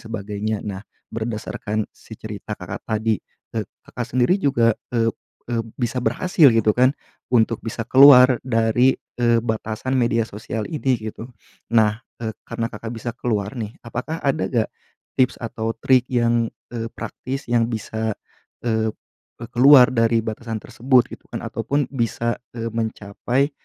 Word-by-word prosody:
sebagainya. 105 -1 -3
Nah, 100 -2 -4 0.3
berdasarkan 110 -1 -3
si - - -13
cerita - - -7
Kakak - - -8
tadi, 110 -1 0 0.3
e - - 0 0.2
Kakak - - -4
sendiri 125 +8 +3
juga, 120 - +3 0.2
eee 115 -1 +2 0.4
eee, 120 -1 0 0.2
bisa 125 0 -1
berhasil 145 +6 +4
gitu 110 -1 +3
kan 130 +2 +5 0.4
untuk 115 -2 +3
bisa 115 0 -4
keluar 130 -2 +8
dari, 120 +2 +3 0.2
eee, 120 -1 +4
batasan 110 +3 -3
media 115 -2 +2
sosial 105 +1 -5
ini 135 -5 0
gitu. 110 +2 -7 0.4
Nah, 110 -1 +3 0.2
eee, 110 -1 -3 0.2
karena 115 - -2
Kakak 110 +2 -7
bisa 115 +1 -5
keluar, 105 -4 -1
nih, 110 -2 -5
apakah 125 +8 -4
ada 140 +3 +1
nggak 115 -4 +1 0.5
tips 130 -1 +3
atau 115 -1 -3
trik 130 +1 +3
yang, 120 -1 +2 0.2
eee, 115 -1 -3
praktis 130 +4 -6
yang 120 -1 +2
bisa, 110 -1 -3 0.5
eee, 110 -1 +1 0.5
e - - -5
keluar 130 0 +8
dari 115 -1 +3
batasan 110 0 -4
tersebut, 125 0 +2
gitu - - -11
kan, - - -5
ataupun 140 +6 -1
bisa, 115 -1 -1 0.2
eee, 115 0 -2
mencapai, 115 +4 -1
115 Hz, 145 wpm, -22 LUFS, 110-125 Hz, 0.5 s, keluar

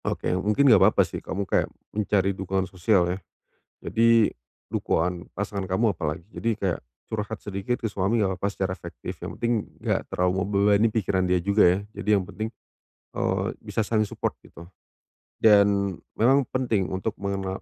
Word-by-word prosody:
Oke - - -2
mungkin 105 +9 +2
enggak - - +7
apa-apa - - +5
sih - - -6
kamu 100 +1 -3
kayak, - - +1 0.2
mencari 100 -2 +1
dukungan 95 0 -2
sosial 95 0 +2
ya. 95 - -2 0.7
Jadi 115 -1 +4 0.4
dukungan 85 0 -1
pasangan 100 -2 -3
kamu 105 +2 +2
apalagi. 80 0 -4
Jadi 115 -2 -1
kayak 95 -5 -1 0.3
curhat 110 0 -4
sedikit 100 +5 -2
ke - - -6
suami 100 +4 0
enggak 95 -3 +1
apa-apa 100 - 0
secara 95 -1 -2
efektif. - - -8
Yang - - -5
penting 120 0 +1 0.3
enggak - - +1
terlalu 90 0 +1
membebani 100 +2 +3
pikiran 100 -4 0
dia 90 - +4
juga 100 +2 +4
ya. - - -3 0.2
Jadi 105 - -3
yang 95 - -1
penting, 110 +4 -5 0.7
eee, - - 0
bisa 110 - -2
saling 110 -1 +1
support - - -3
gitu. 85 - -14 0.8
Dan 100 -3 +4 0.2
memang 130 +4 +4
penting 115 -7 0
untuk 95 +3 -2
mengena 95 -1 -3
100 Hz, 165 wpm, -25 LUFS, 95-110 Hz, 0.8 s, enggak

